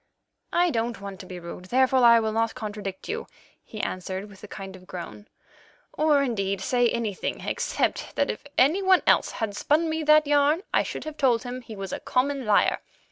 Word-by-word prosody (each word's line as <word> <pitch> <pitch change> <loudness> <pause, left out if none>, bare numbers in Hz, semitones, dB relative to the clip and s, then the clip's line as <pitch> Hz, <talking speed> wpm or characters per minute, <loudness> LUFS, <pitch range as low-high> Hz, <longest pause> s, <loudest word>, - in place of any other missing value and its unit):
"I 350 0 +3
don't 230 -2 -2
want 195 -1 -8
to 185 - -10
be 180 -1 -7
rude, 170 +1 -9
therefore 260 +5 +3
I 235 -2 +7
will 220 -1 -1
not 225 +1 0
contradict 205 -5 -6
you," 455 +2 -4 0.4
he 215 - -9
answered 190 +2 -4
with 195 - -16
a - - -8
kind 195 -1 -8
of 185 -1 -15
groan, 185 +3 -8 0.7
"or, 300 -2 +3
indeed, 200 -6 -1
say 245 +5 +2
anything 225 -5 -3
except - - -2
that - - +1
if - - -9
any 310 +10 +4
one 375 -1 +4
else - - +3
had 215 -3 -3
spun 315 +8 +1
me 320 0 -1
that 305 0 +6
yarn 290 +4 +3
I - - +4
should - - -5
have 310 -1 -7
told 250 -5 +2
him 250 0 -6
he 225 -3 -10
was 195 -1 -6
a - - -3
common 270 -1 -1
liar. 210 - +3
235 Hz, 200 wpm, -26 LUFS, 200-285 Hz, 0.7 s, I